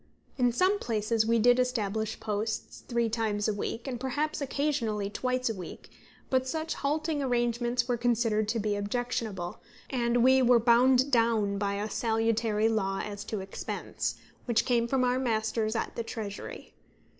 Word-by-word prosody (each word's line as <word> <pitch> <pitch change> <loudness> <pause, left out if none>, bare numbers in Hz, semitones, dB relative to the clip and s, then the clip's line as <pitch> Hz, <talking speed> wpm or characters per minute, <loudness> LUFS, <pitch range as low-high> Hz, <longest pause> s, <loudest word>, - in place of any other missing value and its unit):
In 245 -2 +3
some 370 - +2
places 220 - 0
we 230 0 +3
did 245 +2 +5
establish 220 -3 -1
posts 215 +1 -3
three 235 -1 +1
times 215 -2 -1
a 215 - +1
week, 225 +4 -4
and 250 -3 -3
perhaps 290 +5 -2
occasionally 240 -8 -1
twice 255 +2 -1
a 225 - 0
week; 185 -4 -9 0.4
but 260 0 +2
such 315 +3 -2
halting 305 +1 -1
arrangements 240 -1 0
were 245 -1 +1
considered 225 -3 +1
to 225 +2 0
be 210 -1 0
objectionable, 205 -4 -3 0.3
and 240 -2 +2
we 260 +1 +6
were 245 -1 +6
bound 250 +3 +4
down 225 -4 +2
by 200 0 0
a 205 +1 -2
salutary 225 -1 +1
law 195 -3 0
as 205 -1 -6
to 215 -3 -3
expense, 190 0 -4 0.3
which 235 -2 +2
came 235 -2 +2
from 260 +1 +1
our 250 +1 +2
masters 220 -2 0
at 230 - -2
the - - -2
Treasury. 215 -3 -7
230 Hz, 160 wpm, -29 LUFS, 215-250 Hz, 0.4 s, we